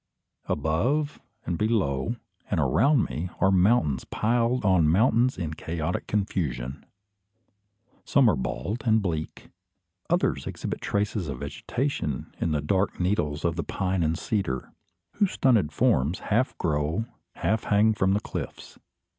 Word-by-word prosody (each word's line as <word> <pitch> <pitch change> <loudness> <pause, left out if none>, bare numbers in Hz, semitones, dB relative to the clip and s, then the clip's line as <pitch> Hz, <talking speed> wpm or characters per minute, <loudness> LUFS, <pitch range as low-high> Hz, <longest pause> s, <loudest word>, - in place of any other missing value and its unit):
Above, 120 - 0 0.2
and 85 -1 -2
below, 105 - 0 0.3
and - - 0
around 140 -4 +3
me, 85 +4 -4
are 95 - +4
mountains 90 - +3
piled 115 +1 0
on 90 -5 +4
mountains 115 +8 +3
in 80 -4 -3
chaotic 80 +1 -3
confusion. 75 - -2 1.2
Some 140 -4 +4
are 105 - +4
bald 70 - -3
and 110 -1 +4
bleak; 80 -6 -4 0.6
others - - +1
exhibit - - -4
traces 100 -3 -1
of 70 - -5
vegetation 75 - -3
in 85 - 0
the 75 -1 0
dark 95 +6 0
needles 90 -6 0
of 85 0 0
the 85 - -1
pine 95 -1 -1
and 80 0 +1
cedar, 80 - -2 0.4
whose 200 -3 +2
stunted 110 - +3
forms 70 +6 +2
half 115 +5 0
grow, 80 +5 0 0.3
half 110 +2 0
hang 105 +2 +4
from 95 -2 +2
the 105 - +1
cliffs. - - -7
95 Hz, 135 wpm, -26 LUFS, 75-110 Hz, 1.2 s, are